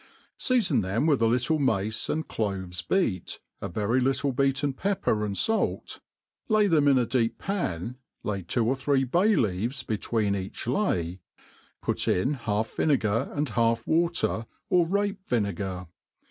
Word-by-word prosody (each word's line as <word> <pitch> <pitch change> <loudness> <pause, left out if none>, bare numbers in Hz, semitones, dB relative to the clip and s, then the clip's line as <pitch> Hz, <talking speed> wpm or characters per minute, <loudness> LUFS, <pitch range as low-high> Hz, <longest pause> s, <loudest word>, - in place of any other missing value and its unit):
Seafon 195 - +2
them 100 +8 0
with 145 -6 +3
a 115 - +5
little 125 +7 +1
mace 110 -5 0
knd 160 0 -1
cloves 95 -4 -3
beat, 105 - -1 0.2
a - - -3
very 110 +7 +1
little 135 +2 +1
beaten 135 +2 +1
pepper 175 - 0
and 100 -2 -2
fait, 225 0 0 0.5
lay 215 -1 +4
themin 145 -6 +4
a 120 - +2
deep 115 -2 0
pan, 125 - -3 0.3
lay 100 -2 -2
two 110 +7 0
or 130 +4 +2
three 135 0 +1
bsly 185 - +3
leaves 110 +5 -1
between 105 -1 0
each 95 0 -5
lay, 95 - 0 0.6
put - - -1
in 130 +11 +2
half 110 -4 -2
vinegar 115 -8 +1
and* 145 -1 0
half 115 +1 +1
wai 170 +2 +3
ter, 115 -9 -1 0.2
or 175 -2 +4
rape«vinegar. 115 - -1
120 Hz, 145 wpm, -27 LUFS, 105-150 Hz, 0.6 s, a